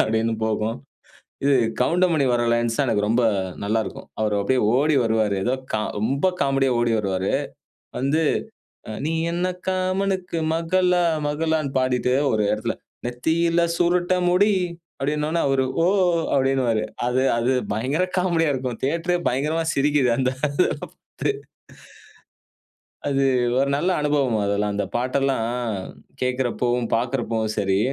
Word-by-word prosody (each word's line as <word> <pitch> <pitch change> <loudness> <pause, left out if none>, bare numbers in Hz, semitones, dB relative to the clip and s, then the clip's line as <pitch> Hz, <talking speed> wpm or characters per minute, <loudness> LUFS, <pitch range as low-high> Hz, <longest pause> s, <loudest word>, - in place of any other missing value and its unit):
அப்பிடீன்னு 110 +1 +1
போகும். 110 +1 -1 0.7
இது 140 - +4 0.3
கவுண்டமணி 170 -1 +2
வர்ற 120 0 +1
லைன்ஸ் 120 -1 0
தான் 140 - +2
எனக்கு 105 -2 +1
ரொம்ப 120 +2 +2 0.4
நல்லாருக்கும். 110 +1 -2
அவரு 105 -1 +1
அப்பிடியே 125 +6 +1
ஓடி 145 +2 +3
வருவாரு. 110 -3 +1
ஏதோ 125 - +1 0.2
கா 110 - +1 0.2
ரொம்ப 135 - +1
காமெடியா 135 -2 +2
ஓடி 120 -1 +1
வருவாரு. 95 -2 -1 0.7
வந்து 145 +5 +1 0.7
அ - - -5
நீ 160 - -1 0.2
என்ன 175 +2 -1 0.2
காமனுக்கு 185 -1 -1 0.2
மகளா? 180 +2 +2 0.2
மகளான்னு 155 -1 0
பாடிட்டு, 125 -1 +1 0.2
ஒரு 110 - +1
இடத்துல 105 0 -1 0.3
நெத்தியில 165 +7 +1
சுருட்ட 175 +1 +2
முடி 190 +4 +4 0.5
அப்பிடீனவுனே, 150 +4 -1
அவரு 135 -1 +2 0.2
ஓ - - +3 0.5
அப்பிடீன்னுவாரு. 130 -5 +2 0.2
அது, 125 +1 +1 0.2
அது 120 +3 +1 0.2
பயங்கர 135 - 0
காமெடியா 170 -4 +2
இருக்கும் 125 -3 -4
தியேட்ரே 170 +5 0
பயங்கரமா 150 +6 -1
சிரிக்கிது 140 -2 +2
அந்த 130 -1 +2 0.3
இத - - +1
பாத்து - - -5 1.8
அது 135 -1 +1 0.3
ஒரு 140 - +2
நல்ல 170 +6 0
அனுபவம் 140 -7 +1
அதெல்லாம். 100 0 0
அந்த 100 - -1
பாட்டெல்லாம் 130 -1 0 0.8
கேட்குறப்பவும், 125 -1 0
பார்க்குறப்பவும் 115 -3 -1
சரி, 95 -1 +1
135 Hz, 125 wpm, -23 LUFS, 115-160 Hz, 1.8 s, இது